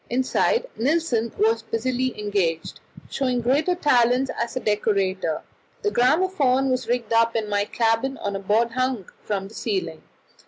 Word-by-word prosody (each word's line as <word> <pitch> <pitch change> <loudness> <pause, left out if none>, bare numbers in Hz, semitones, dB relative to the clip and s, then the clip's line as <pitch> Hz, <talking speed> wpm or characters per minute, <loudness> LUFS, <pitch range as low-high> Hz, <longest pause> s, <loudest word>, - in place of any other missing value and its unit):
Inside 260 - +1
Nilsen 245 -4 0
was 225 +1 +2
busily 245 +2 -2
engaged, 195 -6 -1 0.3
showing 255 -2 -1
great 265 +7 +1 0.2
talents 250 -1 +3
as 235 - -3
a - - 0
decorator. 195 -6 0 0.4
The 415 - +1
gramophone 270 -2 +2
was 255 -2 -1
rigged 235 -2 -1
up 230 +1 +3
in 220 -2 -1
my 205 0 0
cabin 230 +5 0
on 200 -1 -3
a - - -2
board 220 +4 +1
hung 255 -5 -1
from 195 -2 -3
the 210 - -15
ceiling. 180 -9 -3
230 Hz, 150 wpm, -23 LUFS, 210-255 Hz, 0.4 s, talents